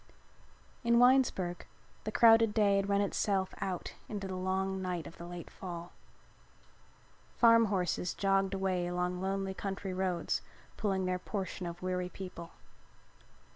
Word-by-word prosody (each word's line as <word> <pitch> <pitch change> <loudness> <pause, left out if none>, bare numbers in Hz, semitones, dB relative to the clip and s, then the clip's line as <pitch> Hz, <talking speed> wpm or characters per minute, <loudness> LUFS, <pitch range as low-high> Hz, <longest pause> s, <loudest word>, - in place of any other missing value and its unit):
In 235 0 +4
Winesburg 245 -9 +3 0.4
the 215 - -2
crowded 225 -1 +6
day 205 -2 +4
had 195 0 0
run 200 0 +3
itself 195 -1 0
out 185 -2 -3 0.2
into 200 -3 -4
the 190 - -5
long 190 +1 -1
night 180 -4 -3
of 165 - -11
the 170 - -7
late 175 -1 -8
fall. 175 -2 -7 1.5
Farm 230 -1 +7
horses 180 -3 -1
jogged 195 0 +1
away 185 -2 0
along 180 0 -2
lonely 195 0 -1
country 195 0 -4
roads 185 -2 -1 0.3
pulling 195 -3 0
their 180 0 0
portion 185 -2 -4
of 170 +1 -7
weary 180 -1 -1
people. 180 -3 -8
190 Hz, 135 wpm, -32 LUFS, 180-200 Hz, 1.5 s, Farm